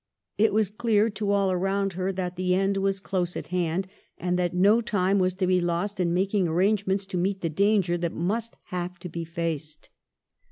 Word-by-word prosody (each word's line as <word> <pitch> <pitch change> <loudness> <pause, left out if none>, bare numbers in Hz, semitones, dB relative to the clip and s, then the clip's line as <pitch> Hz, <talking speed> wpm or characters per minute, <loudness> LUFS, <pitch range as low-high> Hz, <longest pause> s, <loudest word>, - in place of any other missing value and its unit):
It 220 +1 +4
was 210 -2 +1
clear 220 0 +2
to 210 -1 -3
all 200 -1 +2
around 195 +1 0
her 185 +2 -1
that 180 -1 -3
the 180 0 +1
end 195 +1 +1
was 195 0 0
close 180 -2 -2
at - - -7
hand, 180 +1 0 0.3
and 180 0 -1
that 175 -1 +1
no 200 +6 +4
time 200 -3 +1
was 185 -1 +1
to 185 0 0
be 185 0 +3
lost 175 +4 -1
in 175 -2 +1
making 190 +1 +1
arrangements 195 +3 +1
to 190 -1 -4
meet 190 +2 -1
the 165 - -1
danger 195 -1 +2
that 170 -1 -1
must 220 +7 -2
have 180 0 -4
to 180 +1 -8
be 170 +1 -4
faced. 160 -2 -4
185 Hz, 200 wpm, -26 LUFS, 175-200 Hz, 0.3 s, It